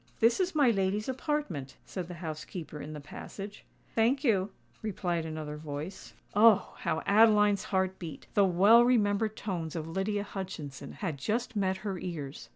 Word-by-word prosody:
"This 230 Hz, +6 st, +4 dB
is 370 Hz, -2 st, 0 dB
my 280 Hz, -5 st, +5 dB
lady's 195 Hz, +1 st, 0 dB
apartment," 260 Hz, -, -2 dB
said 180 Hz, -3 st, -5 dB
the 175 Hz, -, -7 dB
housekeeper 155 Hz, -1 st, -6 dB
in 155 Hz, -, -7 dB
the 150 Hz, -, -6 dB
passage. 195 Hz, +7 st, -9 dB, 0.3 s
"Thank 245 Hz, +5 st, +2 dB
you," 205 Hz, -7 st, +2 dB, 0.3 s
replied 175 Hz, -6 st, -2 dB
another 155 Hz, -1 st, -5 dB
voice. 150 Hz, +4 st, -7 dB, 0.2 s
Oh! 215 Hz, 0 st, +5 dB
how 160 Hz, -, -1 dB
Adeline's 210 Hz, -1 st, +5 dB
heart 190 Hz, -1 st, 0 dB
beat,—the 180 Hz, +5 st, -1 dB
well 200 Hz, +6 st, +6 dB
remembered 215 Hz, -3 st, +2 dB
tones 170 Hz, -6 st, -3 dB
of 160 Hz, -1 st, -3 dB
Lydia 195 Hz, +4 st, -1 dB
Hutchinson 180 Hz, -9 st, -6 dB
had 160 Hz, -8 st, -4 dB
just 230 Hz, -, -1 dB
met 190 Hz, -2 st, +1 dB
her 195 Hz, -3 st, -2 dB
ears. 155 Hz, -6 st, -6 dB
190 Hz, 155 wpm, -30 LUFS, 160-215 Hz, 0.3 s, well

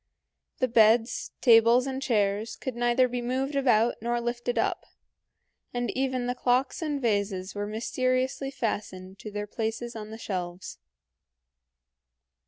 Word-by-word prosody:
The 255 Hz, -, +1 dB
beds, 225 Hz, 0 st, +3 dB
tables, 235 Hz, +1 st, +6 dB
and 265 Hz, 0 st, -3 dB
chairs 210 Hz, -3 st, 0 dB
could 260 Hz, -3 st, -5 dB
neither 240 Hz, +1 st, +3 dB
be 245 Hz, 0 st, -3 dB
moved 260 Hz, +4 st, -1 dB
about 240 Hz, -4 st, +3 dB
nor 240 Hz, +1 st, 0 dB
lifted 240 Hz, +1 st, -2 dB
up, -, -, 0 dB, 0.9 s
and 245 Hz, 0 st, -1 dB
even 260 Hz, -2 st, -1 dB
the 245 Hz, -, 0 dB
clocks 255 Hz, +3 st, 0 dB
and 300 Hz, -3 st, -1 dB
vases 200 Hz, -5 st, -1 dB
were 205 Hz, 0 st, -3 dB
mysteriously 255 Hz, +4 st, -1 dB
fastened 200 Hz, -7 st, -4 dB
to 215 Hz, -, -7 dB
their 205 Hz, 0 st, -4 dB
places 225 Hz, +2 st, -4 dB
on 215 Hz, -1 st, -7 dB
the 220 Hz, -, -8 dB
shelves. 180 Hz, -4 st, -5 dB
240 Hz, 135 wpm, -27 LUFS, 215-255 Hz, 0.9 s, tables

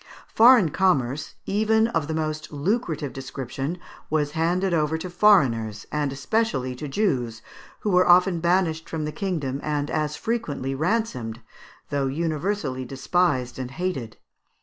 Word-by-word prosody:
Foreign 230 Hz, -6 st, +7 dB
commerce, 145 Hz, -6 st, 0 dB
even 220 Hz, +2 st, +2 dB
of 165 Hz, -8 st, -1 dB
the 160 Hz, -, -2 dB
most 155 Hz, -1 st, -3 dB
lucrative 155 Hz, -, -1 dB
description, 135 Hz, +3 st, -5 dB, 0.3 s
was 150 Hz, -1 st, 0 dB
handed 175 Hz, +4 st, 0 dB
over 155 Hz, -1 st, +1 dB
to 180 Hz, +2 st, -6 dB
foreigners, 125 Hz, -, +3 dB
and 150 Hz, -2 st, -1 dB
especially 140 Hz, -, -1 dB
to 150 Hz, +4 st, -6 dB
Jews, 130 Hz, -, -1 dB, 0.4 s
who 210 Hz, -, 0 dB
were 180 Hz, 0 st, +4 dB
often 180 Hz, 0 st, +5 dB
banished 170 Hz, -2 st, +1 dB
from 155 Hz, -2 st, -3 dB
the 150 Hz, -, -3 dB
kingdom 150 Hz, -6 st, -2 dB
and 145 Hz, -1 st, -2 dB
as 150 Hz, -1 st, -1 dB
frequently 150 Hz, -, -2 dB
ransomed, 135 Hz, -, -1 dB, 0.5 s
though 140 Hz, -1 st, 0 dB
universally 155 Hz, -1 st, -2 dB
despised 135 Hz, 0 st, 0 dB
and 130 Hz, -1 st, -4 dB
hated. 135 Hz, -7 st, -4 dB
155 Hz, 135 wpm, -24 LUFS, 135-185 Hz, 0.5 s, Foreign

